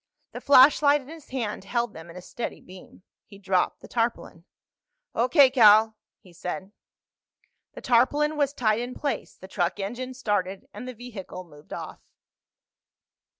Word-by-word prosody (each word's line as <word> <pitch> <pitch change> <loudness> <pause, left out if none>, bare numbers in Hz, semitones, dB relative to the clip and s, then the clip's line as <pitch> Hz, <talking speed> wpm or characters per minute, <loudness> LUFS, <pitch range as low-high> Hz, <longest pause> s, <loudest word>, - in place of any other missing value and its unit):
The - - -8
flashlight 285 +2 +6
in 265 - -16
his 320 -2 -12
hand 230 -7 -4
held 235 +1 -2
them 160 +1 -11
in 170 - -12
a 180 - -9
steady 240 - -6
beam. 185 0 -15 0.2
He 205 -3 -14
dropped 190 -2 -1
the - - -12
tarpaulin. 230 -7 -3 0.7
"O.K., 260 +3 +4
Cal," 220 -3 +6 0.2
he 185 -4 -19
said. 185 +3 -6 1.0
The - - -10
tarpaulin 290 +6 +2
was 285 -2 +1
tied 220 -5 0
in 245 +1 -5
place, 285 - -4
the 190 - -13
truck 180 -1 -2
engine 245 +6 -5
started, 205 -2 -2
and 250 - -8
the 255 - -7
vehicle 210 -6 -9
moved 150 -3 -18
off. - - -7
230 Hz, 150 wpm, -25 LUFS, 190-255 Hz, 1.0 s, flashlight